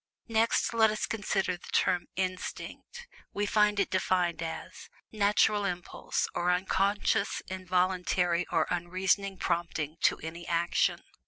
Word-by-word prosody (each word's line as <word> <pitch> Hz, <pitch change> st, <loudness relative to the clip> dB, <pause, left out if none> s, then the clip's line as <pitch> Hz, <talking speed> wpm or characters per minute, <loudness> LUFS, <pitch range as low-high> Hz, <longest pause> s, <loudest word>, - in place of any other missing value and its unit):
Next, 225 Hz, +1 st, +2 dB
let 220 Hz, -1 st, +5 dB
us 215 Hz, 0 st, -1 dB
consider 195 Hz, -4 st, -1 dB
the -, -, -14 dB
term, 180 Hz, -1 st, +2 dB
"INSTINCT"; 190 Hz, -, -5 dB, 0.3 s
we 205 Hz, -, 0 dB
find 210 Hz, 0 st, +3 dB
it 200 Hz, -, +1 dB
defined 180 Hz, -2 st, +1 dB
as 165 Hz, -1 st, -6 dB, 0.2 s
"NATURAL 210 Hz, 0 st, +3 dB
IMPULSE, 180 Hz, -3 st, -2 dB
OR 175 Hz, +1 st, 0 dB
UNCONSCIOUS, 200 Hz, +3 st, +1 dB
INVOLUNTARY, 180 Hz, -1 st, +1 dB
OR 165 Hz, -2 st, +2 dB
UNREASONING 185 Hz, +3 st, 0 dB
PROMPTING 165 Hz, -3 st, -2 dB
TO -, -, +3 dB
ANY 170 Hz, +2 st, -7 dB
ACTION." 170 Hz, 0 st, +1 dB
185 Hz, 120 wpm, -29 LUFS, 175-205 Hz, 0.3 s, let